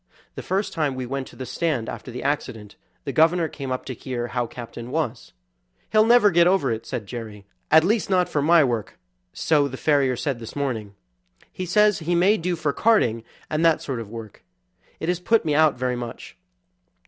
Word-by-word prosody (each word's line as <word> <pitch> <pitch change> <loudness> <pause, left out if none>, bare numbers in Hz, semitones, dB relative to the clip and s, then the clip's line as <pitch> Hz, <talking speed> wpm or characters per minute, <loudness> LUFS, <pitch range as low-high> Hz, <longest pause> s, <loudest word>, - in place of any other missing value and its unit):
The - - -6
first 195 +1 -2
time 150 -5 -1
we 130 -1 -4
went 135 +1 -4
to - - -14
the 130 - -6
stand 130 -2 -2
after - - -7
the 125 +1 -6
accident 125 -7 -3 0.3
the 140 - -3
governor 160 +4 +3
came 140 -3 -7
up 130 - -3
to 130 - -5
hear 120 -1 -5
how 120 -1 -1
Captain 120 0 -9
was. 150 -4 -3 0.6
"He'll 215 0 +4
never 235 -4 +6
get 170 0 +5
over 180 -9 +2
it," 115 0 -4
said 110 - -4
Jerry, 110 -3 -8 0.2
"at 160 +1 +6
least 210 +4 +1
not 185 -2 +3
for 145 - -1
my 165 +2 +5
work, 120 -5 -2 0.3
so 150 -3 +2
the 130 -1 -7
farrier 140 -4 +2
said 130 0 -3
this 115 - -9
morning. 115 -8 -3 0.6
He 185 - -5
says 210 +2 +3
he 170 +2 -1
may 190 +5 +4
do 175 +1 -1
for 155 -3 -1
carting, 120 - +2 0.2
and 155 +1 -1
that 165 -1 +4
sort 130 -4 -3
of 110 -3 -7
work. 110 -2 -10 0.6
It 160 - -4
has 180 0 0
put 225 +3 +2
me 150 - +1
out 155 -2 +4
very 125 0 -1
much. 120 -1 -7
140 Hz, 205 wpm, -23 LUFS, 120-170 Hz, 0.6 s, never